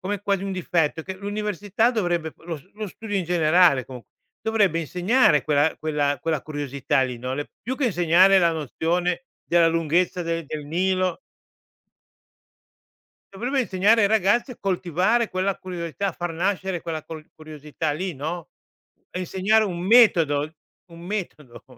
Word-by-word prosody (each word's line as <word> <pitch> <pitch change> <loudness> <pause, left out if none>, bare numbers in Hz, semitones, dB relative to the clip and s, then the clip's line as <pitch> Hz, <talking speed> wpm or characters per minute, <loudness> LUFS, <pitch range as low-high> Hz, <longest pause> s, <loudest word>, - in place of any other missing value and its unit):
come, 200 +1 -3
quasi 200 -2 0
un 195 - -3
difetto 165 -3 0
che 190 +2 -6
l'università 205 +2 -1
dovrebbe 175 -7 -1
lo 165 -3 -7
lo 215 0 -5
studio 205 +2 -7
in 190 - +1
generale 165 -4 +4
comu 125 -3 -10 0.4
dovrebbe 205 -7 +2
insegnare 180 - +2
quella 150 +1 +2
quella 145 -3 0
quella 160 -4 -1
curiosità 140 -3 -1
lì 125 -2 -3
no, 130 +2 -4
le 145 +1 -5
più 255 +4 -3
che 280 - -1
insegnare 180 0 +5
la 170 - +4
nozione 170 - -1 0.2
della 170 -1 +4
lunghezza 165 +2 0
del 165 -2 -3
del 150 -1 -6
Nilo. 185 - 0 2.1
Dovrebbe 255 +6 -1
insegnare 205 +2 +3
ai 200 - +4
ragazzi 220 +5 +2
a 245 - -11
coltivare 190 +4 0
quella 185 +1 -1
curiosità, 180 +1 -4
a - - -1
far 175 0 -5
nascere 190 0 -1
quella 160 -2 -4
col 155 0 -10
curiosità 155 0 -5
lì 180 +4 -3
no, 160 +4 -5 0.6
a 180 - -4
insegnare 195 +4 +2
un 180 -5 -3
metodo, 170 -9 +4 0.4
un 170 -1 -14
metodo. 165 - -6
175 Hz, 150 wpm, -24 LUFS, 155-195 Hz, 2.1 s, insegnare